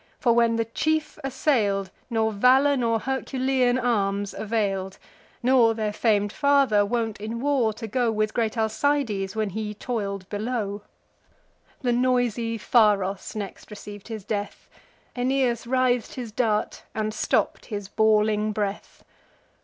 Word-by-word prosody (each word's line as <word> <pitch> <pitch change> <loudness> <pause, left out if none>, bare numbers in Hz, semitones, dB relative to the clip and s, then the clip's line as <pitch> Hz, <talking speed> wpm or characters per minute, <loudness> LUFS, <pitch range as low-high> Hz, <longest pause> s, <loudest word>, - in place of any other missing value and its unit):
for, 235 - +3
when 230 -1 +3
the 230 0 0
chief 310 +7 -1
assail'd, 210 -8 0 0.2
Nor 220 -2 +1
valour 260 +7 +4
nor 230 -3 +1
Herculean 260 -1 0
arms 205 -5 0
avail'd, 200 -3 -2 0.5
Nor 240 -3 +4
their 215 -2 -2
fam'd 205 -2 +1
father, 280 -8 +3
wont 225 -1 -2
in 225 +2 -4
war 265 -4 +2
to 225 +2 -7
go 235 +1 0
With 215 0 -1
great 230 -1 -1
Alcides, 220 -3 0
while 220 -1 0
he 210 +2 -4
toil'd 200 -5 -4
below. 210 -1 -3 1.0
The 245 -1 +2
noisy 240 -2 +1
Pharos 205 -3 +2
next 205 -3 -6
receiv'd 205 -1 -10
his 220 -3 -6
death: 205 0 -4 0.5
Aeneas 250 -2 0
writh'd 250 -1 +1
his 240 -4 -6
dart, 215 -2 0
and 215 0 -1
stopp'd - - 0
his 205 -4 -5
bawling 215 0 +2
breath. 205 -1 -4
225 Hz, 130 wpm, -25 LUFS, 210-245 Hz, 1.0 s, valour